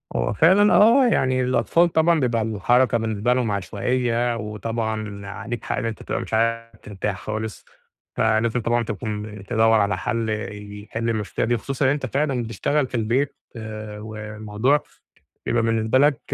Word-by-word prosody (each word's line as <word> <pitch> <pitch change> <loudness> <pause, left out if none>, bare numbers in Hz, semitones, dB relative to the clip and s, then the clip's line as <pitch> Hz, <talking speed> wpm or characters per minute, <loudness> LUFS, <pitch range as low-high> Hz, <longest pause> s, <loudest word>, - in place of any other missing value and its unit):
هو - - 0
فعلًا، 190 - +5
آه 240 +5 +6
يعني 130 - +2
الأطفال 165 +7 +2
طبعًا 160 0 +4
بيبقى 120 -4 +1
الحركة 115 +3 +2
بالنسبة 110 +1 0
لهم 125 -4 0
عشوائية، 120 +4 0
وطبعًا 110 -1 -4
عليك 115 +3 -6
حق، - - -2
إن - - -2
أنت 115 -1 -4
تبقى - - -3
مش - - -8
عارف 115 +1 0
ترتاح 100 -1 -4
خالص. 110 0 -5 0.5
فلازم 115 +2 +2
طبعًا 120 +1 +1
تكون 105 -3 -5
تدوّر 110 -1 +3
على 100 -2 +1
حل 110 +2 -2 0.5
يحل 115 +2 -3
المشكلة 110 -2 -1
دي، 120 0 +1
خصوصًا 135 +2 0
أنت 145 -2 -2
فعلًا 135 -2 -1
بتشتغل 130 +5 0
في 125 - -7
البيت. 120 +5 0 0.2
آآ 110 -1 -7
والموضوع 110 +5 -1 0.6
بيبقى 120 -1 +1
بالنسبة 115 +2 +1
لك 145 -2 +4
115 Hz, 150 wpm, -23 LUFS, 110-125 Hz, 0.6 s, آه